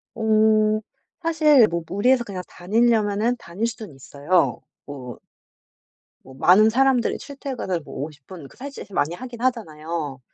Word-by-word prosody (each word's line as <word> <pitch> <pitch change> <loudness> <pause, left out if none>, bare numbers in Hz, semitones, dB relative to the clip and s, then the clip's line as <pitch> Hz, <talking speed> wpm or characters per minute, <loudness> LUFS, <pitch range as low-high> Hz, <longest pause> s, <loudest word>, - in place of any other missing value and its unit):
어. 215 -1 +3 0.4
사실 305 -7 +5
뭐 170 -2 -3
무리해서 245 +6 +2
그냥 195 -5 -6
다니려면은 220 +3 +1
다닐 190 +5 -4
수는 220 -10 -8
있어요 140 -1 0 0.2
뭐 130 -5 -9 1.0
뭐 130 - -14
많은 190 +10 +5
사람들이 260 0 +2
출퇴근을 260 - -5
뭐 - - -12
50 150 -3 -14
분 175 -7 -10
그 - - -20
사실 280 +2 -8
많이 170 -2 -1
하긴 245 0 -9
하잖아요. 160 - -3
210 Hz, 275 characters per minute, -23 LUFS, 165-240 Hz, 1.0 s, 사실